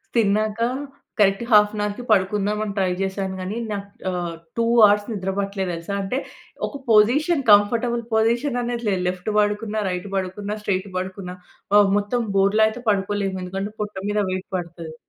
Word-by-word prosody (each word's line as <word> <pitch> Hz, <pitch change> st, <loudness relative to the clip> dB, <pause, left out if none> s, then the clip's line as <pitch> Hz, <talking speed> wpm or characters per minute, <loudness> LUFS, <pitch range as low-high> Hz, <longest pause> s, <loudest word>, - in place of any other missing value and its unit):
తిన్నాక 215 Hz, 0 st, +2 dB, 0.6 s
correct 195 Hz, +1 st, +3 dB
half 210 Hz, -1 st, +6 dB
an 210 Hz, -, -2 dB
హౌర్‌కి 210 Hz, +4 st, -3 dB
పడుకుందాం 205 Hz, +1 st, +2 dB
అని 205 Hz, -2 st, -4 dB
ట్రై 190 Hz, -2 st, +2 dB
చేశాను 190 Hz, 0 st, -2 dB
గానీ, 190 Hz, +4 st, -4 dB
నాకు 200 Hz, -1 st, -4 dB, 0.2 s
ఆహ్, 175 Hz, -2 st, -3 dB, 0.2 s
2 230 Hz, -, +2 dB, 0.2 s
హౌర్స్ 205 Hz, 0 st, +5 dB
నిద్ర 195 Hz, -3 st, -2 dB
పట్టలే 195 Hz, -1 st, -2 dB
తెలుసా! 170 Hz, +3 st, -5 dB
అంటే 195 Hz, +6 st, -2 dB, 0.5 s
ఒక 280 Hz, -, -8 dB
పొజిషన్ 275 Hz, +9 st, +4 dB
కంఫర్టబుల్ 235 Hz, +3 st, +3 dB
పొజిషన్ 235 Hz, +4 st, +2 dB
అనేది 240 Hz, -1 st, -3 dB
లేదు. 190 Hz, -2 st, 0 dB
లెఫ్ట్ 180 Hz, +3 st, -4 dB
పడుకున్నా, 210 Hz, +1 st, 0 dB
రైట్ 180 Hz, +1 st, -4 dB
పడుకున్న, 195 Hz, +2 st, -3 dB
స్ట్రెయిట్ 195 Hz, -1 st, -1 dB
పడుకున్నా 185 Hz, 0 st, -5 dB, 0.4 s
ఆహ్, 205 Hz, -1 st, +6 dB
మొత్తం 205 Hz, +4 st, -1 dB, 0.2 s
బోర్ల 200 Hz, +2 st, +3 dB
అయితే 220 Hz, +3 st, -5 dB
పడుకోలేము. 200 Hz, -1 st, 0 dB
ఎందుకంటే, 195 Hz, +3 st, -4 dB
పొట్ట 210 Hz, -1 st, -4 dB
మీద 210 Hz, 0 st, 0 dB
వెయిట్ 185 Hz, 0 st, -4 dB
పడతది. 170 Hz, -2 st, -7 dB
205 Hz, 160 wpm, -22 LUFS, 190-215 Hz, 0.6 s, half